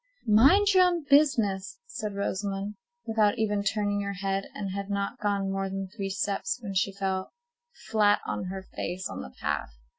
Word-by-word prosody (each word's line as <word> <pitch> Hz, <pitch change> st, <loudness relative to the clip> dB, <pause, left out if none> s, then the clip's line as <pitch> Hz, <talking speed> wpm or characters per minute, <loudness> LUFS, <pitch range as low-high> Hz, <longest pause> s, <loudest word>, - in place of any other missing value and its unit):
"Mind 290 Hz, -, +6 dB
your 370 Hz, -1 st, +7 dB
own 350 Hz, -3 st, +1 dB
business," 265 Hz, -, +3 dB
said 215 Hz, -, -5 dB
Rosamond, 200 Hz, 0 st, -2 dB, 0.3 s
without 220 Hz, 0 st, +2 dB
even 210 Hz, -2 st, +1 dB
turning 205 Hz, 0 st, 0 dB
her 200 Hz, 0 st, -3 dB
head, 195 Hz, +1 st, -2 dB
and 200 Hz, -2 st, -3 dB
had 200 Hz, +1 st, -4 dB
not 200 Hz, 0 st, -2 dB
gone 200 Hz, -2 st, 0 dB
more 195 Hz, 0 st, -1 dB
than 195 Hz, 0 st, -4 dB
three 195 Hz, -3 st, -3 dB
steps 205 Hz, +5 st, -1 dB
when 200 Hz, -3 st, -4 dB
she 195 Hz, +1 st, +1 dB
fell 190 Hz, -1 st, -3 dB, 0.6 s
flat 210 Hz, -2 st, +4 dB
on -, -, -3 dB
her 190 Hz, +1 st, -5 dB
face 185 Hz, 0 st, -4 dB
on -, -, -6 dB
the -, -, -8 dB
path. -, -, -2 dB
200 Hz, 175 wpm, -28 LUFS, 195-220 Hz, 0.6 s, your